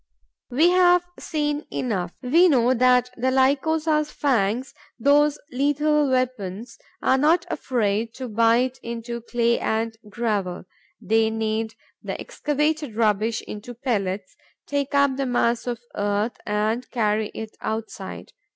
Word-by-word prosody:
We 305 +8 +4
have 355 -1 +5
seen 295 -1 -2
enough: 190 -8 -2
we 330 +9 +5
know 250 -3 +4
that 250 0 +3
the 255 +2 +1
Lycosa's 300 +4 +2
fangs, 245 -2 0 0.2
those 290 +4 +4
lethal 290 +2 +2
weapons, 235 -4 -2 0.2
are 265 - +3
not 325 +5 +3
afraid 225 -5 -1
to 260 -1 -5
bite 230 +3 +2
into 235 0 -5
clay 235 0 +1
and 225 +1 -1
gravel. 205 -6 -2 0.3
They 220 0 +2
knead 220 0 -2 0.3
the - - -5
excavated 300 -3 -1
rubbish 220 0 +1
into 220 +4 -8
pellets, 200 -6 -2 0.3
take 285 0 -2
up 280 -2 +3
the 275 -1 -1
mass 240 -1 +1
of 240 -2 -2
earth 205 +3 -1
and 215 +4 -1
carry 215 -2 0
it 220 -1 -7
outside. 220 0 -5
245 Hz, 125 wpm, -24 LUFS, 220-280 Hz, 0.3 s, have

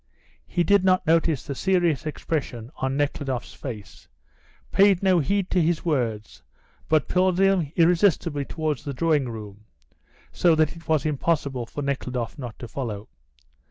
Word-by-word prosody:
He 175 - 0
did 200 +3 +4
not 185 -1 +3
notice 160 -2 +2
the 140 - -4
serious 175 -3 +1
expression 135 -6 -4
on 130 +1 -1
Nekhludoff's 140 -3 -2
face, 110 -7 -9 0.6
paid 195 -1 +4
no 185 -2 +4
heed 195 +5 0
to 180 - +3
his 165 0 0
words, 115 -9 -2 0.5
but 155 -2 +3
pulled 185 0 +2
him 195 -6 +2
irresistibly 170 -3 +3
towards 155 -3 -3
the 140 -3 -5
drawing 150 -3 +1
room, 105 -2 -9 0.7
so 170 -2 +3
that 155 +1 +1
it 165 - -14
was 155 -3 +1
impossible 140 -4 -1
for 145 - -5
Nekhludoff 125 -4 -3
not 120 -4 -7
to 120 - -8
follow. 110 -4 -5
150 Hz, 150 wpm, -24 LUFS, 130-175 Hz, 0.7 s, did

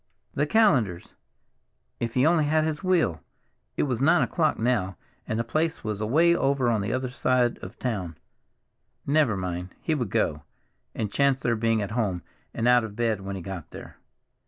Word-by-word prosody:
The 145 +2 0
Callenders! 130 - +2 0.9
If 115 -1 -3
he 130 +2 +3
only 160 -2 +3
had 155 +1 +2
his 155 +1 -3
wheel—it 175 - -2
was 125 -4 -1
nine 165 +5 +4
o'clock 160 -3 0
now, 110 -6 0 0.3
and 110 - -2
the 115 - 0
place 155 +7 -1
was 105 -1 -3
away 160 +10 +3
over 135 -5 +1
on 110 -3 +1
the 100 +3 -2
other 130 0 -2
side 125 -2 +1
of 95 +5 -9
town. 95 -10 -3 0.9
Never 140 -7 +2
mind, 90 0 -5
he 160 - -1
would 125 -9 -2
go, 75 -4 0 0.5
and 105 -2 -3
chance 140 -2 +2
their 115 - +1
being 115 -1 +1
at 100 - -5
home 105 -6 -1 0.3
and 115 +1 -1
out 125 -1 +5
of 105 -2 -7
bed 115 -3 0
when 95 0 -5
he 95 - -7
got 95 -4 -7
there. - - -11
120 Hz, 180 wpm, -26 LUFS, 100-145 Hz, 0.9 s, out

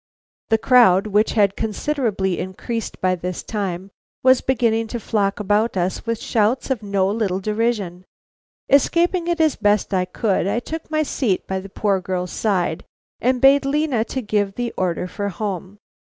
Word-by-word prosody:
The 225 - +4
crowd, 220 -6 +5
which 210 +1 +1
had 200 -3 +3
considerably 220 -5 -1
increased 220 +5 -5
by 185 0 +2
this 180 0 -4
time, 195 -3 -4 0.3
was 260 0 +5
beginning 230 -3 +1
to 235 +2 -4
flock 200 -2 -1
about 210 +1 +1
us 185 +5 -2
with 230 -1 -1
shouts 230 +5 0
of 250 -5 -1
no 200 -2 0
little 200 -3 -1
derision. 210 -4 -2 0.6
Escaping 340 +5 +2
it 345 0 0
as 315 -2 +3
best 205 -1 +1
I 185 -1 +2
could, 190 0 -1
I 205 - 0
took 315 +6 -7
my 310 0 +1
seat 240 -10 -1
by 190 0 -2
the 195 +1 -10
poor 195 -1 0
girl's 180 -1 -3
side, 185 -6 -1 0.4
and 255 +1 +1
bade 275 +2 +6
Lena 275 -4 +1
give 210 -5 -2
the 245 -1 -3
order 180 -1 -1
for 200 +2 -4
home. 195 0 -5
210 Hz, 165 wpm, -21 LUFS, 190-245 Hz, 0.6 s, bade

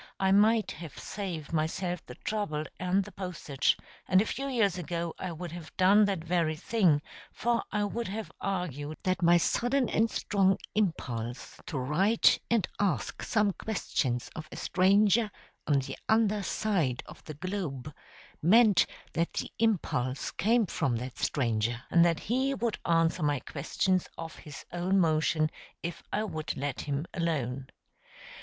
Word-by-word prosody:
I 190 0 +3
might 215 +1 +4
have 160 -3 -9
saved 175 -7 -5
myself 170 +3 -1
the 125 - -9
trouble 205 -9 -2 0.2
and 185 +2 +2
the 210 - -11
postage 175 -7 -1 0.3
and 185 - +5
a 210 - +3
few 275 +5 -3
years 225 -8 +2
ago 170 0 -3
I 185 - -3
would 170 0 -6
have 170 -2 -10
done 200 +3 +6
that 195 -5 -1
very 165 -2 +1
thing, 165 -4 +2 0.3
for 235 0 0
I 210 0 +1
would 230 +3 -2
have 215 +3 -5
argued 155 -6 -3
that 185 0 0
my 175 0 +6
sudden 245 +8 +1
and 225 +2 +2
strong 195 -3 +2 0.2
impulse 125 - -2
to 150 - -3
write 175 - +3
and 230 -6 +2
ask 200 -3 0
some 210 -3 +2
questions 130 - -2
of 155 -1 -7
a - - -7
stranger 200 +4 +3 0.4
on 145 - +4
the 135 0 -3
under 215 -2 +3
side 175 - 0
of - - -13
the 155 - -7
globe 155 -5 -4 0.5
meant 210 +3 +6 0.3
that 170 +1 0
the - - -3
impulse 140 - 0
came 225 +4 +2
from 135 -8 -1
that 125 +2 -5
stranger, 115 -2 0
and 170 - +6
that 170 -2 +2
he 260 +4 0
would 235 -3 -2
answer 165 +1 +2
my 145 -2 +1
questions 180 +7 -1
of 165 -1 -6
his 150 -2 -10
own 180 +3 +1
motion 155 -2 +2 0.3
if 170 0 -4
I 210 - 0
would 155 -7 -4
let 140 -1 -3
him 145 +1 -2
alone. 135 -7 -2
175 Hz, 155 wpm, -29 LUFS, 155-205 Hz, 0.5 s, done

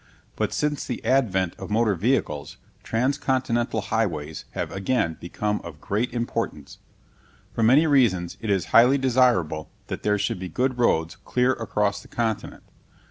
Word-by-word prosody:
But - - -1
since 150 -1 -1
the 125 - -5
advent 95 -9 +2
of - - -7
motor 110 0 +2
vehicles, 90 - -1 0.2
transcontinental 125 -2 0
highways 80 -9 -1
have - - -3
again 95 -4 0
become 105 +4 -2
of - - -9
great 110 +4 -1
importance. 120 0 -4 0.7
For - - -2
many 130 +8 +5
reasons 115 - +2
it 110 - -4
is 95 -3 +1
highly 125 +4 +7
desirable 120 - +2 0.2
that - - -4
there 105 0 +1
should 95 - -1
be 90 0 -5
good 130 +3 -1
roads 80 -7 +1
clear 125 +1 +2
across 105 -4 -1
the - - -16
continent. 110 -3 -3
115 Hz, 145 wpm, -24 LUFS, 95-125 Hz, 0.7 s, highly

